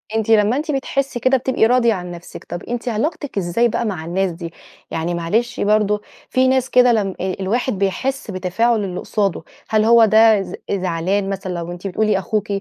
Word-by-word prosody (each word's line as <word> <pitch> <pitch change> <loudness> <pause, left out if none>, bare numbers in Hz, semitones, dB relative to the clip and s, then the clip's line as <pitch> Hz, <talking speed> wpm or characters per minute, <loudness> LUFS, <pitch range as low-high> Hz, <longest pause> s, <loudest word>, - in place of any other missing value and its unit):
أنتِ، 225 0 -1
لمّا 215 +3 +4
أنتِ 305 +2 -2
بتحسّي 275 -2 -2
كده 260 +2 +3
بتبقي 255 -2 +1
راضية 235 -1 +3
عن 180 -2 -6
نفسِك، 170 0 -10
طب 175 - -7
أنتِ 245 +1 -5
علاقتِك 280 +2 -3
إزاي 195 +6 +1
بقى 235 +1 -2
مع 180 -7 -4
الناس 185 +2 0
دي؟ 165 0 -8 0.4
يعني 165 +2 -2
معلش 220 +9 -1
برضه، 210 0 +2 0.3
في 255 0 +2
ناس 260 0 +1
كده، 250 -1 +5
لم 200 -4 0
أ 185 0 -1
الواحد 230 +6 -1
بيحس 205 +5 -2
بتفاعُل 205 +5 0
اللي 180 -2 -4
قصاده، 195 -6 -1 0.3
هل 215 -1 +3
هو 230 0 +7
ده 220 -1 +5
ز - - -7 0.2
زعلان 190 +1 -1
مثلًا، 190 -1 -4
لو 170 0 -5
أنتِ 175 +3 -6
بتقولي 210 +1 +1
أخوكِ 210 +2 -2
210 Hz, 190 wpm, -19 LUFS, 185-240 Hz, 0.4 s, هو